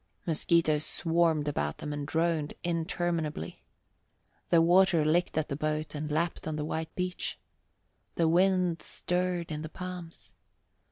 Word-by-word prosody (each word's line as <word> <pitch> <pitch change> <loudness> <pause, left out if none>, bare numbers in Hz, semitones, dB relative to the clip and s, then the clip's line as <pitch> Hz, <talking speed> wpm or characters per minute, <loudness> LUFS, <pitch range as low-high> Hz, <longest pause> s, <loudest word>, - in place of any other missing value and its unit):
Mosquitoes 160 -2 +2
swarmed 165 -2 +1
about 75 - -1
them 150 - -5
and 145 -1 -4
droned 160 -2 0
interminably. 165 - -2 0.9
The 170 - +6
water 175 -1 +5
licked 170 +2 +2
at 155 - +1
the 140 - -3
boat 155 +1 -2
and 150 0 -4
lapped 165 +3 -1
on 155 - -2
the 150 -1 -2
white 160 +1 -4
beach. 180 0 -3 0.8
The 165 - +3
wind 180 0 +3
stirred 180 -2 -2
in 150 0 -3
the 155 - -6
palms. 180 -1 -8
165 Hz, 135 wpm, -30 LUFS, 155-175 Hz, 0.9 s, The